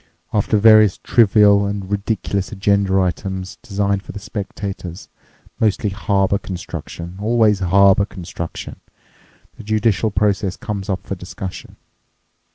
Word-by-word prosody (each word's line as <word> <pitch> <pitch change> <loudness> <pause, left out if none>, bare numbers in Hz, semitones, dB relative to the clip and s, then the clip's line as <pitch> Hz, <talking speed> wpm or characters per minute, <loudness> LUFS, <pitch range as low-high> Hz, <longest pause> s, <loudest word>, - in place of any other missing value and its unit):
After 105 +1 +2
various 110 -2 +6
trivial 105 -3 +4
and 100 -1 -5
ridiculous 100 -1 -2
agenda 100 -2 +1
items 95 0 -3
designed 100 -1 -1
for - - -10
the - - -7
spectators—mostly 100 +1 -5
harbour 100 -1 +1
construction—always 100 +4 -1
harbour 100 +2 +4
construction—the 90 -4 -10
judicial 110 0 +1
process 100 -1 0
comes 100 -3 -5
up 95 -1 -2
for - - -4
discussion. 90 0 -8
100 Hz, 100 wpm, -19 LUFS, 95-105 Hz, -, various